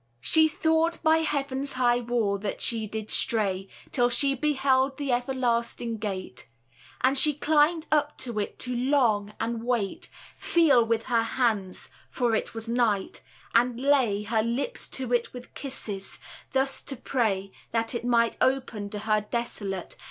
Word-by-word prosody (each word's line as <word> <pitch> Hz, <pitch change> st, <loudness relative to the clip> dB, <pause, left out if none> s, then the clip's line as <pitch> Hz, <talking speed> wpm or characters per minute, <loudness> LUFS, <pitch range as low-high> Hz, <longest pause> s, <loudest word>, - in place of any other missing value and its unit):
She 315 Hz, -, +6 dB
thought 320 Hz, +2 st, +1 dB
by 320 Hz, 0 st, +4 dB
heaven's 280 Hz, -3 st, -2 dB
high 245 Hz, -1 st, +2 dB
wall 230 Hz, -4 st, -1 dB
that 200 Hz, 0 st, -4 dB
she 225 Hz, -2 st, +2 dB
did 215 Hz, 0 st, -4 dB
stray 200 Hz, -6 st, +2 dB, 0.2 s
Till 245 Hz, -2 st, +2 dB
she 275 Hz, +3 st, +3 dB
beheld 270 Hz, -1 st, +1 dB
the 285 Hz, -3 st, -2 dB
everlasting 240 Hz, -2 st, -1 dB
gate: 190 Hz, -, -5 dB, 0.5 s
And 260 Hz, +2 st, +3 dB
she 295 Hz, +1 st, +4 dB
climbed 310 Hz, +2 st, +2 dB
up 295 Hz, -1 st, +1 dB
to 235 Hz, -4 st, -4 dB
it 205 Hz, -, -4 dB
to 250 Hz, 0 st, -3 dB
long, 240 Hz, -6 st, +1 dB
and 230 Hz, 0 st, -3 dB
wait, 235 Hz, -5 st, -2 dB, 0.3 s
Feel 315 Hz, -8 st, +4 dB
with 225 Hz, 0 st, 0 dB
her 235 Hz, -2 st, +1 dB
hands 225 Hz, -5 st, -1 dB, 0.2 s
(for 240 Hz, -3 st, 0 dB
it 220 Hz, -, -2 dB
was 225 Hz, 0 st, -1 dB
night), 230 Hz, -4 st, 0 dB, 0.3 s
and 240 Hz, 0 st, +2 dB
lay 255 Hz, -7 st, +2 dB
Her 220 Hz, +1 st, 0 dB
lips 235 Hz, -, -2 dB
to 255 Hz, -2 st, -3 dB
it 240 Hz, -1 st, 0 dB
with 250 Hz, -1 st, -11 dB
kisses; 210 Hz, -8 st, -6 dB, 0.3 s
thus 270 Hz, +1 st, 0 dB
to 275 Hz, -, -5 dB
pray 215 Hz, -7 st, -1 dB, 0.2 s
That 230 Hz, +1 st, -1 dB
it 235 Hz, -, -3 dB
might 235 Hz, -1 st, +2 dB
open 250 Hz, -6 st, 0 dB
to 210 Hz, -, -4 dB
her 215 Hz, -1 st, 0 dB
desolate. 200 Hz, -6 st, -4 dB
240 Hz, 155 wpm, -26 LUFS, 220-270 Hz, 0.5 s, She